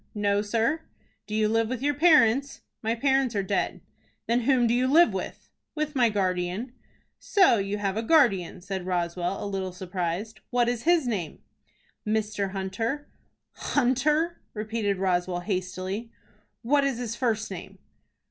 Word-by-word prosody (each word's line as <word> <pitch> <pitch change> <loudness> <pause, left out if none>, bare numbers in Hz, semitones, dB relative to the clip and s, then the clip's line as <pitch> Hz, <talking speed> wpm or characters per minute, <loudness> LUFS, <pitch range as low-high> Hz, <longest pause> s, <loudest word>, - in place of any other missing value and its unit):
"No, 205 -1 +1
sir." 230 +9 0 0.5
"Do 215 - -4
you 215 0 +3
live 225 +1 +1
with 255 0 -4
your 290 +1 +2
parents?" 280 -4 +4 0.2
"My 225 +1 0
parents 265 -1 +1
are 200 - +1
dead." 195 +1 -1 0.4
"Then 235 +1 +2
whom 255 -3 +4
do 230 - +2
you 250 +1 +2
live 330 +6 +5
with?" - - -5 0.3
"With 300 -1 -2
my 245 -3 +4
guardian." 190 +3 -1 0.5
"So 380 - +4
you 200 +1 -2
have 200 -2 -1
a - - +1
guardian?" 225 - +3
said 190 -1 -5
Roswell, 175 +1 -1
a - - -4
little 195 -2 -3
surprised. 180 +3 -4
"What 245 -1 +2
is 240 +1 -2
his 340 -4 +4
name?" 195 -10 -3 0.6
"Mr. 215 -2 -1
Hunter." 205 +9 -3 0.4
"Hunter!" 300 +6 +1
repeated 215 -2 -1
Roswell, 180 -1 0
hastily. 185 +3 -3 0.5
"What 280 +4 +3
is 275 -3 0
his 235 -2 -4
first 225 -4 -1
name?" 190 +1 -8
220 Hz, 150 wpm, -26 LUFS, 190-255 Hz, 0.6 s, live